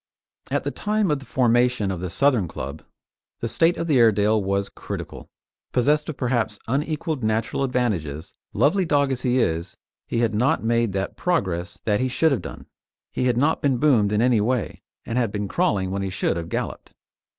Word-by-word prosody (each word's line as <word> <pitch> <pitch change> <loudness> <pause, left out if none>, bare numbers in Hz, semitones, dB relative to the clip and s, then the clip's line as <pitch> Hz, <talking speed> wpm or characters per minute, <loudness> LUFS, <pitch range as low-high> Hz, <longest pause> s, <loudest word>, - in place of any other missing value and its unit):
At - - 0
the - - -2
time 210 -4 0
of 145 - 0
the 135 - -14
formation 120 -4 +2
of 95 - -4
the 90 - -3
Southern 125 -3 +2
club 70 0 -6 0.6
the 115 - -2
state 165 +9 +2
of - - -2
the 150 -6 +3
Airedale 110 -1 +4
was 100 +1 0
critical; - - -8 0.4
possessed 150 +5 +2
of 155 - -5
perhaps 120 -4 0
unequalled 150 +2 -2
natural 110 +4 0
advantages, 95 - -2 0.2
lovely 185 +7 +2
dog 145 -4 +2
as 130 -1 -2
he 125 0 +1
is, 85 -6 -1 0.3
he 115 - -1
had 115 -2 +1
not 120 +4 +1
made 115 -2 +1
that 95 0 -3
progress 90 - -1
that 105 -2 +2
he 130 - +1
should 150 +5 +2
have 135 - 0
done. - - -9 0.5
He 125 - -1
had 125 -2 +2
not 145 +5 +2
been 135 -3 +2
boomed 120 -7 +3
in 105 +2 +2
any 120 -4 +3
way, 120 +1 -1 0.2
and 115 +2 -1
had 115 -4 0
been 105 -1 -3
crawling 100 - 0
when 100 0 -2
he 95 - -2
should 95 - -1
have 85 -1 -5
galloped. - - -4
120 Hz, 195 wpm, -23 LUFS, 100-140 Hz, 0.6 s, Airedale